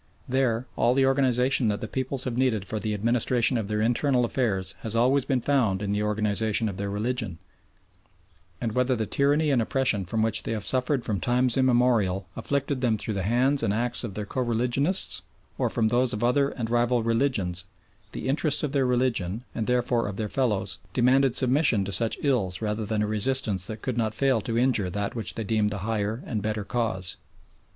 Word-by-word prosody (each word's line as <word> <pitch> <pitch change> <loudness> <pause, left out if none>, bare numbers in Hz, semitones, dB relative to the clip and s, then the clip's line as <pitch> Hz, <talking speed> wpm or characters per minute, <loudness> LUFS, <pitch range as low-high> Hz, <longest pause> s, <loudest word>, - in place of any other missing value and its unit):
There 125 -2 0
all 120 +2 +2
the 135 0 +3
organisation 130 -2 +2
that 105 -1 0
the - - -5
peoples 130 0 -3
have 125 -3 -3
needed 120 -6 0
for 110 +2 -2
the 105 +1 -2
administration 120 +3 +2
of 110 -4 -2
their 105 0 -1
internal 125 +2 +2
affairs 100 -7 -1
has 110 0 -5
always 130 +3 +3
been 130 -3 0
found 115 -8 +1
in 100 - -2
the 105 +1 0
organisation 105 +1 0
of 100 -3 -5
their 100 0 -3
religion, 105 -2 -3 1.2
and 115 -2 -2
whether 125 +2 +1
the 110 -2 -2
tyranny 145 +6 +1
and 130 -4 +2
oppression 115 -5 0
from 110 +5 -1
which 110 -1 +2
they - - -4
have 105 -2 -3
suffered 130 0 +1
from 100 -3 -1
times 125 0 +1
immemorial 120 -8 +2
afflicted 140 -1 -1
them 115 -4 +1
through 110 - -4
the 100 - -2
hands 125 +8 +2
and 100 - 0
acts 120 +2 -2
of 105 -5 -6
their 105 - -4
co 130 - -3
religionists 125 +9 +1 0.4
or - - +1
from 110 -2 +1
those 120 +1 +2
of 105 +2 -3
other 140 +3 +2
and 115 -4 -5
rival 120 0 +2
religions, 115 -7 0 0.5
the - - -6
interests 150 +2 +1
of 150 - -1
their 135 -2 +1
religion, 120 -5 0
and 110 - -3
therefore 125 -2 +1
of 100 - -5
their 110 +1 -2
fellows, 105 -6 -1
demanded 130 +2 +3
submission 130 -5 +3
to 100 - -4
such 110 +4 +2
ills 105 -11 0
rather 105 0 -3
than 105 0 0
a - - -1
resistance 105 -3 +1
that 110 0 -8
could 125 -2 -2
not 110 -2 -1
fail 130 -2 +2
to 115 +2 -3
injure 120 -6 +1
that 100 +2 -3
which 115 -2 -1
they 115 - -3
deemed 105 0 +1
the 105 - -4
higher 110 +1 -2
and 110 -4 -3
better 105 0 -2
cause. 100 -5 -2
115 Hz, 200 wpm, -26 LUFS, 105-130 Hz, 1.2 s, the